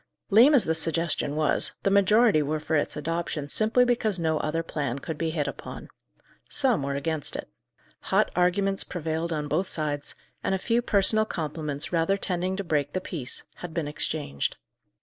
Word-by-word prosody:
Lame 245 +9 +7
as 255 - +4
the 160 - +1
suggestion 160 -2 0
was, 155 -1 +2
the 195 - +2
majority 200 -2 +5
were 150 +2 -1
for 160 - -2
its 145 - 0
adoption 165 -1 -3
simply 220 +8 +3
because 230 -5 +1
no 160 -2 0
other 165 +2 -1
plan 140 -6 -3
could 160 +3 -5
be 165 +2 -2
hit 155 -3 -1
upon. 140 - -7 0.6
Some 255 - +2
were 140 0 -2
against 150 +1 -1
it. - - -5 0.6
Hot - - +3
arguments 195 +2 +2
prevailed 165 -1 -3
on 150 -2 -2
both 165 +6 0
sides, 145 -4 -1 0.3
and 195 - +1
a - - 0
few 230 +5 +1
personal 215 0 +3
compliments 155 -4 -4
rather 170 +4 +2
tending 185 -1 -1
to 200 - -2
break 145 -4 -1
the 185 - 0
peace, 155 -8 -4
had 175 -2 -8
been 165 -3 -1
exchanged. 145 - -2
165 Hz, 175 wpm, -26 LUFS, 150-195 Hz, 0.6 s, Lame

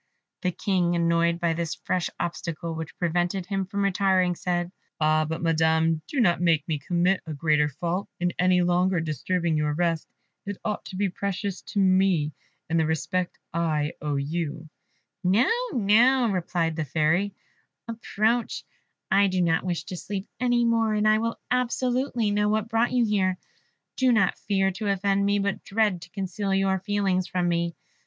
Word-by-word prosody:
The 180 - +1
King, 180 -2 0
annoyed 170 0 +2
by 170 -1 +1
this 165 -1 -3
fresh 180 -1 -2
obstacle, 170 -1 -4
which 160 -1 -7
prevented 175 +2 0
him 195 0 -2
from 200 +1 -2
retiring, 190 -2 +2
said, 175 0 -2 0.3
"Ah, 155 0 +2
Madam, 160 0 +1
do 285 - -2
not 175 -7 +3
make 165 -4 +2
me 155 -3 -1
commit 175 +5 +1
a 155 - -4
greater 150 0 +2
fault, 175 +6 -3
in 175 0 0
any 180 0 +4
longer 180 +1 +2
disturbing 165 +2 -1
your 150 -1 0
rest; 165 -1 0 0.4
it 200 -1 -5
ought 210 -1 -2
to - - -8
be 200 +1 +1
precious 195 +1 -3
to 205 - -4
me, 185 -5 +3 0.3
and 165 0 +1
the 160 - +2
respect 175 +3 -1 0.2
I 155 -3 0
owe 150 -1 -1
you 155 +2 -3 0.3
" - - -48 0.2
"No, 255 - +3 0.2
no," 240 +2 +4
replied 170 -3 -1
the 160 - 0
Fairy, 160 +7 +1 0.5
"approach; 230 0 -1 0.5
I 200 +1 +5
do 185 -1 -1
not 165 -2 +2
wish 175 -3 -2
to 180 0 -7
sleep 195 +2 -5
any 245 -1 +2
more, 225 -2 +2
and 210 0 +2
I 215 0 +4
will 230 +1 -2
absolutely 250 -2 0
know 210 0 +2
what 215 +1 0
brought 225 +1 +1
you 245 -2 +3
here; 190 -3 +1 0.6
do 260 -1 +3
not 210 -5 +2
fear 195 -1 +2
to 200 +3 -5
offend 200 0 +1
me, 205 0 +2
but 200 -1 -2
dread 205 -4 0
to 170 - -11
conceal 195 +1 -2
your 195 0 +1
feelings 195 -2 0
from 180 -1 -1
me. 170 -1 0
185 Hz, 170 wpm, -26 LUFS, 170-205 Hz, 0.6 s, I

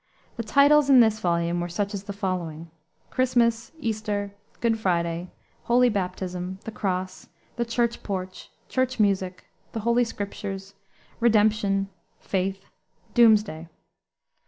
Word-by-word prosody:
The 235 - -3
titles 280 +5 +5
in 265 -2 +8
this 220 -2 +4
volume 170 -1 0
were 175 - -3
such 200 +4 -2
as 200 -1 -5
the 200 - -5
following: 175 -5 -4 0.4
Christmas, 235 -3 +1
Easter, 210 -4 -2 0.3
Good 225 -1 +1
Friday, 170 -2 -1 0.4
Holy 245 +1 +4
Baptism, 185 -2 -3
The 225 - -6
Cross, 185 -3 -3 0.3
The 235 - -1
Church 235 0 0
Porch, 185 -2 -5 0.2
Church 255 -1 -1
Music, 190 -3 +1 0.3
The 225 - -3
Holy 235 +2 +3
Scriptures, 200 -3 -5 0.5
Redemption, 210 -3 +3 0.3
Faith, 195 0 -2 0.5
Doomsday. 215 -8 +4
205 Hz, 120 wpm, -25 LUFS, 185-230 Hz, 0.5 s, in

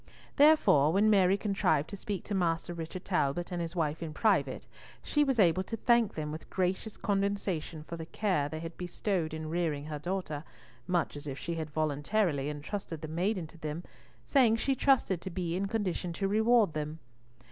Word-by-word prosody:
Therefore, 285 - +6
when 205 +4 +4
Mary 195 -1 +5
contrived 190 -8 +1
to - - -4
speak 200 0 -4
to 210 - -5
Master 175 -2 0
Richard 170 +2 -6
Talbot 175 -1 0
and 175 -1 -2
his 170 +1 -4
wife 160 -2 -1
in 155 -2 -5
private, 220 - +1 0.4
she 295 - +2
was 270 -3 +1
able 185 -3 +4
to 225 - -4
thank 235 -2 +3
them 150 -1 -3
with 155 +1 -8
gracious 190 +3 -1
condescension 195 -6 -1
for 170 +2 -7
the 160 -1 -7
care 180 -10 0
they 155 +1 -5
had 165 0 -6
bestowed 180 -1 -2
in 155 0 -5
rearing 155 -3 -1
her 150 -1 -5
daughter, 175 -3 -3 0.4
much 175 -4 0
as 145 +1 -8
if 135 -1 -4
she 170 - -4
had 160 -2 -4
voluntarily 150 +1 0
entrusted 155 +2 -5
the 155 - -5
maiden 180 +3 -1
to 160 +1 -14
them, 155 +2 -4 0.4
saying 235 - +4
she 270 +4 +1
trusted 260 - +2
to 190 - -5
be 175 -2 -2
in 195 +2 -1
condition 195 -5 -2
to 195 +3 -1
reward 220 -2 +4
them. 150 +1 -3
175 Hz, 190 wpm, -31 LUFS, 155-200 Hz, 0.4 s, Therefore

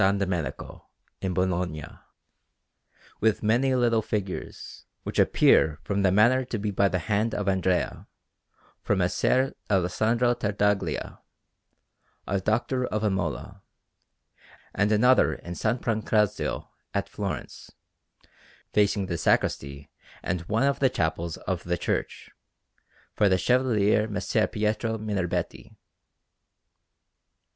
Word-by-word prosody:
Domenico 95 -6 -1 0.3
in 95 - -1
Bologna, 90 -4 -1 1.3
with 110 0 +1
many 125 +5 +2
little 120 -3 +2
figures, 100 -3 -5 0.2
which - - -3
appear 75 -2 +4
from 100 0 -1
the 95 -2 +3
manner 120 +7 +4
to 120 -2 -4
be 105 0 -2
by 100 0 +2
the 90 - 0
hand 105 +5 -1
of 105 - -3
Andrea, 95 -2 0 0.7
for - - +1
Messer 115 +8 +1 0.2
Alessandro 110 +6 +2
Tartaglia, 105 -2 -1 1.1
a 100 0 -1
doctor 120 +5 0
of 105 0 -2
Imola, 95 -3 -2 1.1
and 105 +1 +1
another 125 +5 +4
in 85 - -10
S. 85 - -6 0.2
Pancrazio 110 -2 0 0.3
at - - 0
Florence, - - -6 1.0
facing 100 -1 +2
the 85 -2 -3
sacristy 70 0 0 0.3
and 90 - -2
one 110 +4 +2
of 140 0 +1
the 135 - +4
chapels 80 -6 -2
of 95 -3 -4
the 90 0 -1
church, - - -3 0.8
for 105 - +3
the 95 - +3
Chevalier 110 -1 +2
Messer 105 +1 0
Pietro 110 +1 -1
Minerbetti. 100 -5 -3
105 Hz, 110 wpm, -26 LUFS, 95-110 Hz, 1.3 s, appear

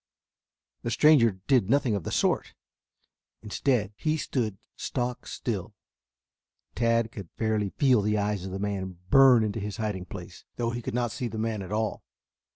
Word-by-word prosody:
The 120 - -3
stranger 130 -5 +5
did 125 -8 +3
nothing 130 -3 +3
of 100 -6 -2
the - - -3
sort. - - 0 0.9
Instead, 105 -1 0
he 155 +8 0
stood 115 -9 -2 0.2
stock 125 -1 -3
still. 105 -2 -4 1.0
Tad 115 -1 +1
could 100 -7 -8
fairly 110 -3 0
feel 130 0 +3
the 105 +1 +1
eyes 105 -2 -1
of 95 - -6
the 95 - -3
man 95 -2 -3
burn 130 -4 +7
into 110 +1 -2
his 105 0 -5
hiding 105 -5 -3
place, - - -9
though 120 -1 -1
he 120 0 -4
could 115 - -4
not 120 -2 0
see 125 - -3
the 115 - -6
man 110 -1 -1
at 95 0 -8
all. 110 0 -1
110 Hz, 165 wpm, -27 LUFS, 100-120 Hz, 1.0 s, burn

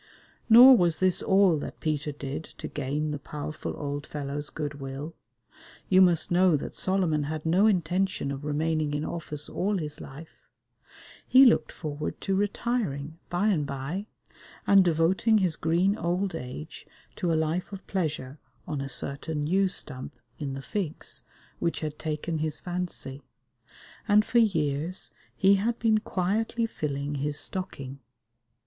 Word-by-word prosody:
Nor 250 +4 +10
was 170 -3 +2
this 185 0 +3
all 190 -5 +4
that - - -7
Peter 150 -1 -1
did 145 +2 -5
to - - -5
gain 150 +2 -2
the 145 - -4
powerful 150 +1 -6
old 145 0 -4
fellow's 145 0 -4
good 145 -2 -5
will. 135 +4 -6 0.8
You 185 0 +6
must 175 -3 +3
know 175 -2 +4
that - - -6
Solomon 180 -6 0
had 155 +1 -4
no 185 +6 +4
intention 185 -5 0
of 140 +1 -5
remaining 150 0 0
in 150 - -2
office 150 -3 -4
all 200 +2 -1
his 150 -4 -5
life. 150 +4 -12 0.8
He 265 +1 +8
looked 230 -10 +4
forward 150 -2 -5
to 195 - -1
retiring 195 - -2
by 185 +5 +1
and 155 -8 +1
by, 145 +10 -4 0.6
and 195 -1 +6
devoting 180 +6 +3
his 185 -6 +2
green 175 +5 +2
old 180 0 -1
age 150 +1 -7 0.3
to 175 - 0
a - - +2
life 160 +5 -1
of 195 -1 -8
pleasure 150 -7 -3 0.3
on 150 -3 -3
a 135 - -4
certain 145 +2 -2
yew 190 +5 +3
stump 145 -6 -3 0.2
in 140 -2 -3
the 135 - -7
Figs 190 -6 -4 0.4
which 170 - -1
had 150 -1 -4
taken 155 +1 -3
his 155 -1 -2
fancy, 175 -6 -4 0.9
and 210 0 +5
for 240 - +3
years 165 -4 0 0.2
he 195 +1 +5
had 225 +4 0
been 220 -2 +3
quietly 215 +4 -1
filling 145 -8 -3
his 145 0 -1
stocking. 140 -8 -5
160 Hz, 150 wpm, -27 LUFS, 145-190 Hz, 0.9 s, Nor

